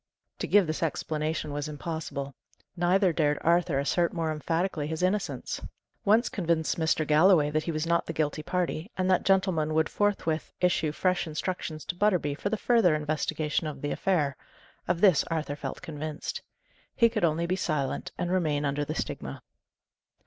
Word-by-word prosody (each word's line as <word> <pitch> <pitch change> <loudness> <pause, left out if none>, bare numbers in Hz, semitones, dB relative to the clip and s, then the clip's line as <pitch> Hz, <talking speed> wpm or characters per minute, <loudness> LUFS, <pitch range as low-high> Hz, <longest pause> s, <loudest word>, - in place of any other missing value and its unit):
To - - -2
give 205 -2 +5
this 155 -1 -3
explanation 155 -1 -2
was 145 +1 -3
impossible; 150 -2 -5 0.4
neither 180 +1 +3
dared 150 -2 +2
Arthur 170 -3 +2
assert 170 +5 +1
more 165 -2 -1
emphatically 165 0 -1
his 160 +2 -3
innocence. 195 +2 -1 0.4
Once 220 +4 +4
convince 165 -4 0
Mr. 160 -1 +1
Galloway 155 0 +5
that 155 +1 0
he 170 - -1
was 155 0 -2
not 170 0 +1
the 165 - -3
guilty 155 -1 -1
party, 175 +1 -2
and 185 0 +1
that 185 - +4
gentleman 185 -5 +2
would 160 0 +2
forthwith 195 -6 -1
issue 175 -4 +2
fresh 180 +3 0
instructions 155 -1 -4
to - - -3
Butterby 180 -7 +2
for 180 +7 -3
the 220 - 0
further 220 -7 +3
investigation 155 +1 -1
of 145 -2 -7
the 145 - -1
affair: 150 -8 +1 0.5
of 175 0 0
this 190 -7 +6
Arthur 155 -3 -2
felt 140 -2 -6
convinced. 155 - -5 0.5
He 230 - +5
could 220 -3 -2
only 165 0 +2
be 180 +2 0
silent 150 -7 -2
and 175 - -2
remain 155 -6 +1
under 140 +1 0
the - - -4
stigma. - - -5
160 Hz, 170 wpm, -28 LUFS, 150-180 Hz, 0.5 s, this